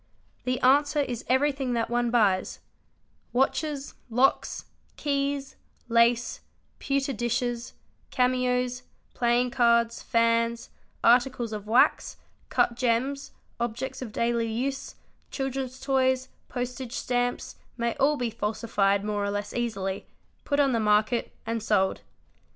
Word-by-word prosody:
The 255 Hz, 0 st, 0 dB
answer 290 Hz, +3 st, +4 dB
is 245 Hz, -4 st, -3 dB
everything 265 Hz, -1 st, +1 dB
that 230 Hz, -1 st, 0 dB
one 240 Hz, 0 st, 0 dB
buys: 205 Hz, -6 st, +2 dB, 0.7 s
watches, 275 Hz, +2 st, 0 dB, 0.2 s
locks, 250 Hz, +4 st, +1 dB, 0.3 s
keys, 280 Hz, -1 st, -1 dB, 0.3 s
lace, 235 Hz, +1 st, +3 dB, 0.4 s
pewter 275 Hz, 0 st, 0 dB
dishes, 240 Hz, +1 st, -2 dB, 0.4 s
cameos, 250 Hz, -1 st, +1 dB, 0.3 s
playing 240 Hz, +1 st, +2 dB
cards, 235 Hz, -2 st, +3 dB
fans, 230 Hz, 0 st, +1 dB, 0.3 s
arti 245 Hz, +3 st, +6 dB
cles 235 Hz, -3 st, -5 dB
of 210 Hz, -1 st, -6 dB
wax, 235 Hz, +4 st, +3 dB, 0.3 s
cut -, -, +2 dB
gems, 255 Hz, +3 st, 0 dB, 0.3 s
objects 240 Hz, +3 st, -3 dB
of 240 Hz, -4 st, -5 dB
daily 235 Hz, 0 st, 0 dB
use, 265 Hz, +4 st, -3 dB, 0.3 s
children's 270 Hz, -1 st, -4 dB
toys, 260 Hz, -1 st, +1 dB, 0.2 s
postage 250 Hz, 0 st, -4 dB
stamps 245 Hz, -1 st, -2 dB, 0.2 s
may 235 Hz, -1 st, 0 dB
all 295 Hz, +2 st, +3 dB
be 245 Hz, -3 st, -2 dB
falsified 210 Hz, -2 st, 0 dB
more 205 Hz, -1 st, -1 dB
or 200 Hz, -, 0 dB
less 205 Hz, 0 st, -3 dB
easily, 200 Hz, -5 st, -3 dB, 0.4 s
put 285 Hz, 0 st, 0 dB
on 275 Hz, -2 st, +4 dB
the 230 Hz, -, +1 dB
market, 215 Hz, +2 st, +2 dB
and 230 Hz, 0 st, -2 dB
sold. 205 Hz, -3 st, +1 dB
240 Hz, 120 wpm, -27 LUFS, 230-260 Hz, 0.7 s, arti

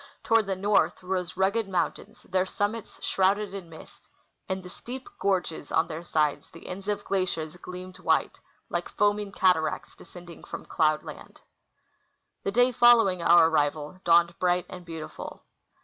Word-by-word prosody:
Toward 225 Hz, -2 st, +3 dB
the 195 Hz, -, 0 dB
north 200 Hz, 0 st, +1 dB
rose 180 Hz, -1 st, -3 dB
rugged 195 Hz, +2 st, +1 dB
mountains, 205 Hz, +4 st, -3 dB
their 185 Hz, 0 st, 0 dB
summits 205 Hz, +3 st, -3 dB
shrouded 195 Hz, +1 st, +1 dB
in 190 Hz, -4 st, -7 dB
mist; 160 Hz, -, -14 dB, 0.4 s
in 190 Hz, 0 st, -2 dB
the -, -, -9 dB
steep 255 Hz, +2 st, -8 dB
gorges 180 Hz, -6 st, -1 dB
on 160 Hz, -, +3 dB
their 165 Hz, 0 st, -6 dB
sides 155 Hz, -3 st, 0 dB
the 165 Hz, -, -14 dB
ends 190 Hz, +2 st, -7 dB
of 205 Hz, -1 st, -1 dB
glaciers 180 Hz, -4 st, -1 dB
gleamed 180 Hz, +1 st, -9 dB
white, -, -, +1 dB, 0.3 s
like -, -, -3 dB
foaming 205 Hz, -1 st, +1 dB
cataracts 180 Hz, -5 st, +1 dB
descending 175 Hz, -1 st, -13 dB
from -, -, -8 dB
cloudland. 155 Hz, -1 st, -1 dB, 1.0 s
The 195 Hz, -, -2 dB
day 245 Hz, +4 st, +4 dB
following' 230 Hz, -7 st, +5 dB
our 170 Hz, -1 st, +7 dB
arrival 150 Hz, +2 st, -1 dB
dawned 170 Hz, 0 st, +4 dB
bright 180 Hz, 0 st, +2 dB
and 180 Hz, -1 st, -9 dB
beautiful. 165 Hz, -2 st, -8 dB
185 Hz, 150 wpm, -27 LUFS, 170-200 Hz, 1.0 s, our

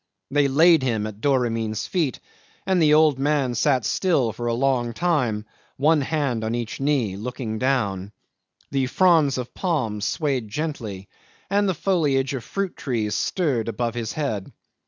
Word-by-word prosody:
They 145 Hz, 0 st, +3 dB
laid 160 Hz, +3 st, +5 dB
him 115 Hz, -5 st, 0 dB
at 110 Hz, 0 st, -8 dB
Doramin's 115 Hz, -5 st, 0 dB
feet, 160 Hz, -9 st, -1 dB, 0.5 s
and 190 Hz, -2 st, +2 dB
the 150 Hz, -1 st, +5 dB
old 155 Hz, -3 st, +4 dB
man 140 Hz, -3 st, +1 dB
sat 130 Hz, 0 st, +1 dB
still 140 Hz, -, +1 dB
for 120 Hz, +2 st, -4 dB
a 120 Hz, -, +1 dB
long 125 Hz, -2 st, +1 dB
time, 125 Hz, -9 st, 0 dB, 0.3 s
one 150 Hz, +2 st, +3 dB
hand 135 Hz, -6 st, -1 dB
on 110 Hz, +1 st, -1 dB
each 120 Hz, -2 st, -4 dB
knee, 135 Hz, -8 st, 0 dB
looking 110 Hz, 0 st, -5 dB
down. 105 Hz, -8 st, 0 dB, 0.6 s
The 135 Hz, -2 st, +1 dB
fronds 160 Hz, -3 st, +3 dB
of 125 Hz, -1 st, -5 dB
palms 115 Hz, -, -1 dB
swayed 135 Hz, -6 st, -1 dB
gently, 110 Hz, -8 st, -4 dB, 0.4 s
and 200 Hz, 0 st, +2 dB
the 185 Hz, -, 0 dB
foliage 145 Hz, -7 st, +1 dB
of 130 Hz, -4 st, -4 dB
fruit 195 Hz, -2 st, -3 dB
trees 115 Hz, -9 st, -2 dB
stirred 140 Hz, -11 st, 0 dB
above 115 Hz, +1 st, -2 dB
his 115 Hz, -2 st, -4 dB
head. 110 Hz, -11 st, -3 dB
130 Hz, 155 wpm, -23 LUFS, 115-150 Hz, 0.6 s, laid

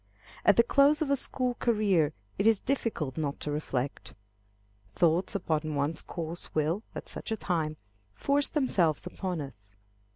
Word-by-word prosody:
At -, -, +5 dB
the 235 Hz, -, +7 dB
close 285 Hz, +5 st, +4 dB
of 280 Hz, -, -2 dB
a -, -, +5 dB
school 255 Hz, -1 st, -1 dB
career 205 Hz, -11 st, +2 dB, 0.3 s
it 200 Hz, -, +3 dB
is 225 Hz, -3 st, +5 dB
difficult 220 Hz, -, -1 dB
not 145 Hz, -3 st, -2 dB
to 150 Hz, -, -2 dB
reflect. 140 Hz, -3 st, -3 dB, 0.8 s
Thoughts 170 Hz, +3 st, +2 dB
upon 155 Hz, -5 st, -1 dB
one's 145 Hz, +3 st, -1 dB
course 170 Hz, 0 st, -7 dB
will, 155 Hz, +6 st, +1 dB
at -, -, -6 dB
such -, -, -5 dB
a 220 Hz, -, 0 dB
time, 160 Hz, -6 st, -1 dB, 0.4 s
force 280 Hz, -, +3 dB
themselves 190 Hz, -, +1 dB
upon 180 Hz, -4 st, -3 dB
us. 105 Hz, -7 st, -10 dB
170 Hz, 155 wpm, -29 LUFS, 150-230 Hz, 0.8 s, the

